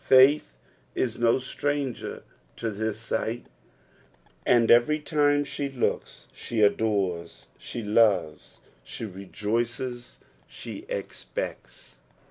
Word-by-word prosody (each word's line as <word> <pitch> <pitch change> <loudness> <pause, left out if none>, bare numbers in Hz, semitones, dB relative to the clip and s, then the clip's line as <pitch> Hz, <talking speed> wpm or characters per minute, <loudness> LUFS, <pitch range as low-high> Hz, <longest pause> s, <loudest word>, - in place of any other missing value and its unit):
Faith 130 - +6 0.4
is 120 -2 -1
no 115 0 +4
stranger 140 0 -3 0.3
to 115 - -3
this 110 +1 -2
sight, 115 +1 -2 1.0
and 115 -2 +5
every 120 +6 +5
time 145 -1 +2
she 140 0 -3
looka 130 -3 -1 0.2
she 115 - -4
adores, 100 -5 +1
she 120 - -6
loves, 105 -7 +2 0.3
she - - -6
rejoices, 115 +5 -3 0.3
she - - -8
expects. - - -6
120 Hz, 100 wpm, -27 LUFS, 105-135 Hz, 1.0 s, Faith